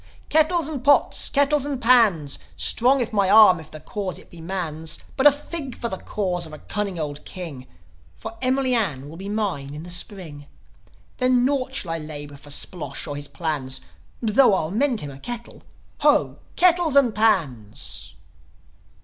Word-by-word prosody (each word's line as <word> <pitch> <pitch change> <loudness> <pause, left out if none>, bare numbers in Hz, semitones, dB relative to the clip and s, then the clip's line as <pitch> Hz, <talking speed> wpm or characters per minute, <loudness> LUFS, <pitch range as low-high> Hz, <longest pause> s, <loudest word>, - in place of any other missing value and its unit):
"Kettles 315 0 +3
and 290 -5 -5
pots! 285 +1 +4
Kettles 285 0 +2
and 285 -2 -3
pans! 225 - +3 0.2
Strong 255 +3 +3
is 235 -1 -3
my 200 -2 +2
arm 205 -4 +7
if 155 -1 -12
the 155 - -9
cause 190 +4 -5
it - - -14
be 170 - -11
man's. 160 -3 -2 0.2
But 275 +2 +6
a - - +8
fig 285 -2 -5
for 235 - -3
the 190 - -5
cause 180 -5 -3
of 155 - -13
a - - -7
cunning 200 +2 -4
old 150 -1 -5
king; 155 -9 -7 0.5
For 225 +1 -8
Emily 260 0 +1
Ann 150 - 0
will 160 - -10
be 195 +2 -7
mine 180 -10 -3
in 150 - -7
the 175 - -8
Spring. 175 -6 -4 0.7
Then 255 -1 +3
nought 265 -1 -1
shall 170 - -2
I 165 - -2
labour 145 -2 -7
for 145 +1 -13
Splosh 155 +3 -2
or 145 -3 -5
his 145 0 -6
plans; 145 -6 -3 0.4
Tho' 225 -1 +5
I'll 160 -3 -2
mend 245 +2 +1
him 145 - -6
a 135 - -12
kettle. 235 - -7 0.4
Ho, - - +2 0.2
kettles 350 -4 +4
and 260 -5 +5
pans!" 155 - -1
195 Hz, 175 wpm, -23 LUFS, 155-255 Hz, 0.7 s, a